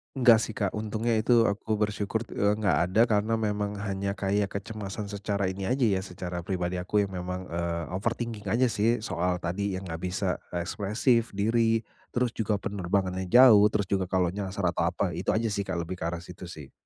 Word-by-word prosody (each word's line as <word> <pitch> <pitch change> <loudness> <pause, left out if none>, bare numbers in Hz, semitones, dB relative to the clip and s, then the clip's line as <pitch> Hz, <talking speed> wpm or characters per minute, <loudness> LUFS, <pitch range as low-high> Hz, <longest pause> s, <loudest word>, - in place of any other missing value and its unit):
Enggak 120 -4 +6
sih 110 -1 -4
Kak. 100 -2 0
Untungnya 110 +2 -2
itu 115 +1 +4
aku 110 +1 0
bersyukur, 105 +1 -1
t - - -18
eee, 105 +1 +3
enggak 100 -4 +2
ada 95 +5 +3
karena 110 -1 +1
memang 105 -2 -1
hanya 100 -1 -3
kayak 100 +1 0
kecemasan 100 0 -6
secara 100 0 -2
ini 95 0 -4
aja 130 +2 +1
ya, 100 -5 +3
secara 90 -2 -6
pribadi 90 0 -2
aku 100 +3 +1
yang 100 - -5
memang, 90 +1 -4
eee, 85 0 -2
overthinking 110 +2 -3
aja 115 +6 +2
sih, 110 +2 +1
soal 90 -3 0
tadi 95 +3 -1
yang 95 - -5
enggak 80 -3 -5
bisa 95 +2 -2 0.3
ekspresif 105 +6 0
diri, 115 +2 +2 0.3
terus 125 -1 +1
juga 110 -2 -1
penerbangannya 95 -1 -2
jauh, 115 -2 +8
terus 105 -2 -2
juga 95 -2 +1
kalau 90 -2 +1
nyasar 100 0 -4
atau 85 -1 0
apa, 90 +1 -1
itu 85 +3 -1
aja 110 0 0
sih 100 -1 -2
Kak, 90 -2 -2
lebih 90 +2 -6
ke 85 - -2
arah 85 0 -4
situ 90 0 -10
sih. 75 -6 -10
100 Hz, 195 wpm, -28 LUFS, 95-110 Hz, 0.3 s, jauh